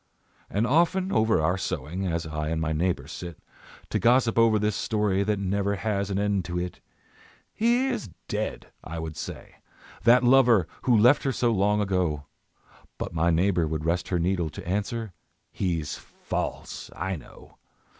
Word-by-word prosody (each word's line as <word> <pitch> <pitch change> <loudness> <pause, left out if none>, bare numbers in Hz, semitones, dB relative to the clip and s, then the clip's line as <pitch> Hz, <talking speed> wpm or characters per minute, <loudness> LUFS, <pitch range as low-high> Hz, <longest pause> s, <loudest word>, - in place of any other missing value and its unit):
And 105 +3 0
often 175 +8 +2
over 110 - +3
our 90 +4 +1
sewing, 90 +2 -3
As 85 -1 -1
I 75 -1 -3
and 80 0 -1
my 80 0 -1
neighbour 85 +3 0
sit 85 -4 -7 0.5
To - - +1
gossip 120 -1 +3
over 115 -1 +5
this 105 0 0
story 105 -3 0
That 105 +1 +1
has 100 -1 -3
never 100 +1 0
an 100 -1 -1
end 100 -2 +1
to 90 -1 -3
it, 90 0 -4 0.7
"He 240 +4 +2
is 245 - -2 0.2
dead," - - -4
I 85 +1 -6
would 80 -1 -5
say, - - -8 0.5
"that 120 +2 +6
lover, 120 -8 +5 0.2
Who 120 -3 +5
left 120 +7 +6
her 135 - 0
so 120 -1 +1
long 105 0 +2
ago," 90 -7 0 0.7
But - - -5
my 85 +1 +2
neighbour 85 0 +2
would 80 0 -3
rest 85 +2 0
her 90 - 0
needle 85 -1 0
To 75 - -9
answer, 105 +2 -2 0.4
"He's 85 -5 -2
false - - -5
I 95 +2 -2
know." 75 - -14
95 Hz, 165 wpm, -26 LUFS, 85-110 Hz, 0.7 s, that